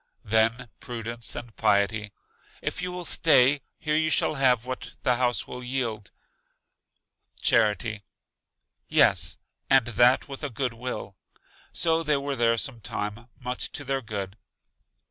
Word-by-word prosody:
Then 115 +3 +2
Prudence 115 -3 -3
and 120 -2 -8
Piety: 105 0 +1 0.5
If - - -3
you 180 - -3
will 180 -1 -6
stay, 140 -4 +4 0.2
here 150 0 -1
you 155 0 +2
shall 155 - +2
have 125 -4 +2
what 130 0 -6
the 125 -1 +2
house 125 -1 +1
will 125 0 -8
yield. 120 -5 -3 1.3
Charity: 110 -1 +2 0.9
Yes, - - +3 0.3
and 135 -3 +5
that 120 +2 +3
with 140 +1 -8
a 145 - -2
good 125 0 -2
will. 125 +2 -6 0.5
So 165 0 +2
they 150 -3 +1
were 140 0 -3
there 115 -2 +2
some 120 -2 -2
time, 105 +4 -5
much 125 -1 -3
to 145 - -5
their 135 0 -1
good. 100 -3 -5
125 Hz, 140 wpm, -26 LUFS, 115-135 Hz, 1.3 s, and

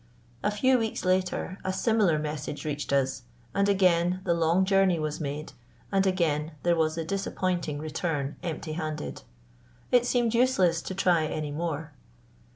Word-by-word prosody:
A 210 - +1
few 255 +5 +3
weeks 220 -4 -2
later 185 +1 0
a 190 - -1
similar 195 -4 +2
message 150 0 -4
reached 145 -1 -3
us; 135 -2 +1 0.3
and 200 0 +2
again 180 -2 +3
the 175 - +2
long 170 +3 +2
journey 195 -2 +3
was 155 -1 -3
made, 150 +1 -4 0.4
and 195 -1 +3
again 160 -4 0
there 175 0 +3
was 160 -1 +1
the 165 -1 -3
disappointing 180 -4 -2
return 150 -2 -2
empty 160 -2 -4
handed. 155 - -4 0.7
It 245 -1 +4
seemed 240 -2 +2
useless 195 -9 +3
to 190 - -6
try 175 -4 +3
any 155 -1 -3
more. 155 -1 -3
170 Hz, 155 wpm, -28 LUFS, 155-195 Hz, 0.7 s, It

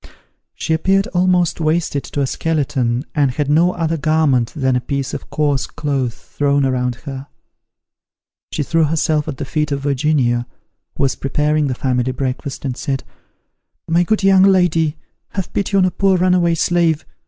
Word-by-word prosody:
She 160 - -1
appeared 195 +5 +2
almost 180 -2 +2
wasted 155 -2 0
to 145 - -3
a - - +2
skeleton, 135 -4 -1
and 145 -3 +2
had 145 +3 -1
no 170 +4 +4
other 165 -1 -1
garment 145 -6 +2
than 130 -4 +1
a 125 - +1
piece 135 +1 -3
of - - -6
coarse 145 -3 0
cloth 135 -5 -2
thrown 140 -1 0
around 125 -2 0
her. 135 0 -6 1.2
She - - -1
threw 165 +2 +2
herself 155 0 0
at 145 -4 -4
the 140 - -4
feet 150 +2 -2
of 140 -1 -1
Virginia, 135 -4 +1 0.5
who - - 0
was 135 - +2
preparing 150 +2 0
the 130 - -2
family 125 0 0
breakfast, 130 +1 -4
and 130 -2 -2
said, 135 -1 -3 0.8
"My 170 +1 +3
good 210 +4 0
young 195 -1 +5
lady, 175 -5 +3 0.4
have 190 -3 -4
pity 200 0 0
on 190 - +4
a 185 - +1
poor 190 +1 +2
runaway 180 -2 +3
slave. 165 -2 +1
150 Hz, 165 wpm, -18 LUFS, 135-170 Hz, 1.2 s, young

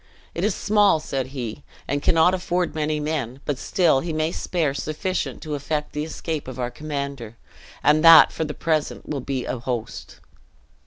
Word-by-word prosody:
"It 170 - -3
is 210 -1 +1
small," 205 -5 +3
said 135 -4 -3
he, 125 -5 -6 0.3
"and 145 +1 -1
cannot 165 +3 +4
afford 180 -1 -1
many 155 0 -1
men; 145 -5 -3
but 145 -3 -2
still 165 -7 +2
he 165 +4 -4
may 155 +1 0
spare 165 -7 -1
sufficient 155 +6 -3
to 155 -2 -5
effect 150 +1 -3
the 150 - -2
escape 160 -2 -4
of 130 -1 -7
our 125 -1 -2
commander; 140 -5 -5 0.5
and 150 +1 +4
that 165 -1 +9
for - - -3
the 150 -1 -5
present 155 -3 -1
will 140 -3 -3
be 130 -1 -3
a 125 - -3
host!" 120 -2 -5
150 Hz, 175 wpm, -23 LUFS, 135-165 Hz, 0.5 s, that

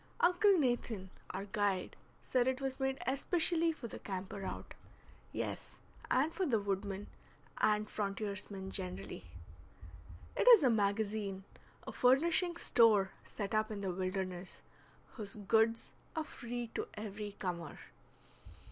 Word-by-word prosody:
Uncle 365 +3 +5
Nathan, 240 - 0 0.2
our 195 - -4
guide, 200 -2 0 0.3
said 250 -1 +2
it 260 0 +1
was 270 0 -3
made 265 0 0
especially 330 +5 +2
for 275 -7 -7
the - - -7
camper 195 0 -5
out; - - -5 0.6
yes, - - -4 0.3
and 285 +6 +3
for 385 - -1
the 240 -10 +2
wood 200 -1 -1
man 200 0 -5 0.5
and 210 0 +3
frontiersman 200 -2 -3
generally. 185 - -4 1.1
It - - +1
is 465 -9 +10
a 255 - +5
magazine, 205 -2 0 0.4
a - - -5
furnishing 335 +7 +3
store 215 - +4
set 200 0 -5
up 215 0 +2
in 210 -2 -4
the 190 -2 -1
wilderness, 185 -1 -3 0.5
whose 210 -4 -7
goods 220 +2 +2 0.2
are 320 - 0
free 240 -5 -5
to - - -2
every 210 -1 -5
comer. 170 -6 -4
215 Hz, 130 wpm, -35 LUFS, 195-260 Hz, 1.1 s, is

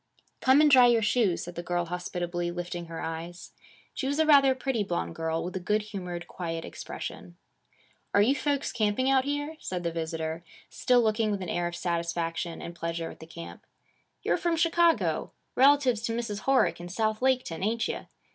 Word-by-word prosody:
'Come 265 +3 +5
and 300 -1 +5
dry 255 -2 +8
your 235 -2 +3
shoes,' 210 -5 +2
said 175 - -7
the 170 - -5
girl 175 0 -1
hospitably, 175 0 -3
lifting 175 0 -5
her 165 0 -6
eyes. 165 +2 -6 0.4
She 265 - -3
was 285 +1 -1
a 315 - +4
rather 275 -3 +6
pretty 260 -4 -1
blonde 170 - -3
girl, 160 0 -2
with 180 +2 -5
a - - -1
good 210 +4 0
humored, 180 -5 -6
quiet 165 -2 -5
expression. 90 -1 -7 0.7
'Are 200 - +4
you 250 +6 +4
folks 285 -1 -1
camping 240 +3 +1
out 265 -1 +3
here?' 290 +2 -3
said 180 -1 -4
the 170 - -1
visitor, 160 0 -3 0.3
still 245 -1 +3
looking 220 0 +1
with 200 -2 -2
an 180 - -5
air 175 0 0
of 175 - -5
satisfaction 170 -1 -2
and 170 - -6
pleasure 165 -1 -4
at - - -14
the 160 - -11
camp. 170 0 -10 0.6
'You're - - +2
from 345 -2 0
Chicago, 335 0 +2 0.2
relatives 265 -4 +4
to 230 -1 -2
Mrs. 215 -3 -4
Horick 270 -8 +3
in 175 0 -7
South 215 +3 0
Laketown, 255 -10 +1
ain't 225 +2 0
you? - - -5
195 Hz, 190 wpm, -28 LUFS, 170-255 Hz, 0.7 s, dry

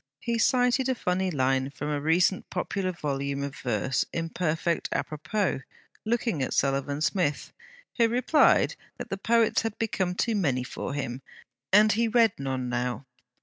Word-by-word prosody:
He 235 -1 -2
cited 250 +1 +3
a 260 - +1
funny 185 -3 0
line 135 -3 +1
from 145 +1 -5
a 145 -1 -1
recent 175 +5 +2
popular 185 +1 -2
volume 140 -4 -3
of 140 -1 -5
verse, 125 +2 0
in 165 -1 -3
perfect 165 0 -1
A - - 0
propos, 155 +2 -2 0.4
looking 230 - 0
at 130 - -1
Sullivan 140 +1 0
Smith; 170 -4 0 0.5
who 230 - +6
replied, 250 +6 +3 0.2
that 245 -2 -8
the 195 - -1
poets 230 +1 +3
had 225 -2 -4
become 190 -5 -1
too 230 +4 0
many 135 -10 +1
for 130 +1 -5
him, 130 -2 -4 0.5
and 210 +2 +6
he 230 +3 +2
read 225 -2 +4
none 130 -2 -2
now. 125 +2 -2
170 Hz, 160 wpm, -27 LUFS, 140-220 Hz, 0.5 s, who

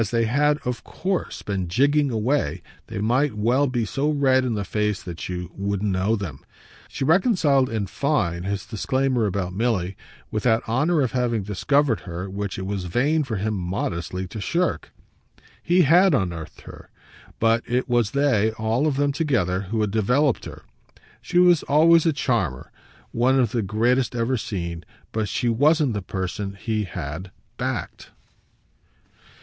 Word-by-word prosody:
As 110 - 0
they 115 -1 +1
had 145 +5 +2
OF 125 -1 -3
COURSE 190 -1 -3
been 95 -3 -2
jigging 145 - +2
away 115 - -1 0.2
they 110 - -6
might 125 +5 +1
well 125 +7 +2
be 120 -3 -1
so 135 +8 -1
red 135 -3 +3
in 120 -3 -1
the 100 -1 -3
face 105 +2 -1
that 85 -1 -7
you 90 -2 -5
wouldn't 100 +1 -2
know 95 +4 +1
them. 85 -10 -6 0.5
She - - -5
reconciled 160 - +3
in 110 -3 -2
fine 95 - -1
his 100 +2 -3
disclaimer 125 +1 0
about 90 -2 -2
Milly 100 -4 -1 0.4
with 110 - -1
that 115 -1 +1
honour 150 +8 +2
of 130 - 0
having 120 -4 0
discovered 115 +6 +1
her 90 +1 -6
which 100 0 -4
it 95 - -4
was 100 -2 -3
vain 145 - +1
for 120 -5 -4
him 105 +2 -1
modestly 90 -1 -3
to 110 - -6
shirk. 170 - -1 0.7
He 175 +1 +3
HAD 175 +3 +5
unearthed 85 - -3
her, - - -13 0.5
but 115 +1 +3
it 125 +1 0
was 120 -4 +2
they, 130 -5 +2
all 110 +6 0
of 145 - 0
them 145 0 +2
together, 125 - 0
who 110 0 0
had 105 -2 0
developed 125 +6 +1
her. - - -10 0.6
She 175 - -2
was 175 -3 +6
always 165 +3 +4
a 160 - +3
charmer, 110 - -1 0.4
one 130 +3 +2
of 120 -5 +2
the 120 -2 0
greatest 120 +5 +1
ever 120 +2 0
seen, 85 -7 -4 0.3
but 110 -2 -2
she 120 - -1
wasn't 145 +3 +3
the 105 - -2
person 95 +2 -4
he 110 -1 -1
had 80 +2 -6 0.3
"backed." - - -4
115 Hz, 165 wpm, -23 LUFS, 100-140 Hz, 0.7 s, was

